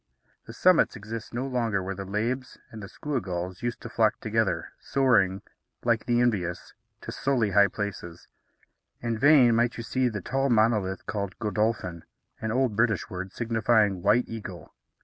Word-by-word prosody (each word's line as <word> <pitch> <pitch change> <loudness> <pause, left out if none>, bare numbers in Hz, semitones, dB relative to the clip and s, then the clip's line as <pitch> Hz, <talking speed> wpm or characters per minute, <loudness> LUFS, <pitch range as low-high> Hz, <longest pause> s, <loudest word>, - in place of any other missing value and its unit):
The - - -8
summits 185 -2 +4
exist 110 +2 -7
no 120 +3 -3
longer 115 -7 -1
where 95 +1 -3
the 95 +1 -7
labbes 120 +6 -2
and 110 - -9
the 100 - -7
skua 145 -4 -3
gulls 90 0 -5
used 120 -1 -3
to - - -7
flock 110 -2 +1
together, 110 -1 -1
soaring, 100 -8 +2 0.4
like 115 -2 +1
the 120 -1 +2
envious, 90 -8 -1 0.3
to - - -7
sully 125 -7 0
high 100 +1 +6
places. 95 -5 -6 0.7
In 115 -1 -1
vain 135 -4 +6
might 120 +2 +1
you 115 - -5
seek 125 0 0
the 105 - -3
tall 135 +7 -1
monolith 110 -4 +1
called 100 -3 -4
Godolphin, 105 -6 -1 0.4
an 110 - -2
old 125 -2 +1
British 115 -1 +1
word, 95 +1 -5
signifying 110 -4 +1
"white 120 +7 +3
eagle." 105 -6 -8
110 Hz, 165 wpm, -27 LUFS, 100-120 Hz, 0.7 s, high